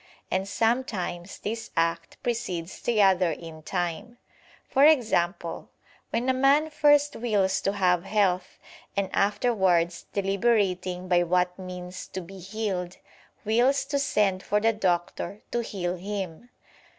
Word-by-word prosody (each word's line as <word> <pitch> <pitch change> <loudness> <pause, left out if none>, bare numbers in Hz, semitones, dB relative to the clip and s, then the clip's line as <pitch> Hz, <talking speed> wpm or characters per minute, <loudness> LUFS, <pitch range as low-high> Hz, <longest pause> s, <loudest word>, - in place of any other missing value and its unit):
And 190 +1 0
sometimes 200 -6 -1
this 225 +2 -5
act 165 0 0
precedes 190 -8 -3
the 220 -4 +3
other 185 -2 +4
in 160 0 -7
time; 175 +7 -3 0.5
for 275 - +3
example 205 - +2 0.4
when 235 +3 -1
a 260 - +4
man 280 +4 +3
first 290 -1 +4
wills 205 -5 +1
to 195 - 0
have 180 -3 +2
health, 185 -3 0 0.4
and 200 -1 0
afterwards 190 -5 +1
deliberating 195 -3 0
by 175 -1 +4
what 180 +1 +1
means 180 0 -7
to 190 - -6
be 190 +2 -11
healed, 190 -2 -3 0.5
wills 245 +6 +3
to 280 - -1
send 205 -8 +1
for 210 +2 +1
the 225 +1 +2
doctor 190 0 -1
to 240 - 0
heal 185 -5 -3
him. 195 +2 -5
195 Hz, 130 wpm, -26 LUFS, 180-225 Hz, 0.5 s, other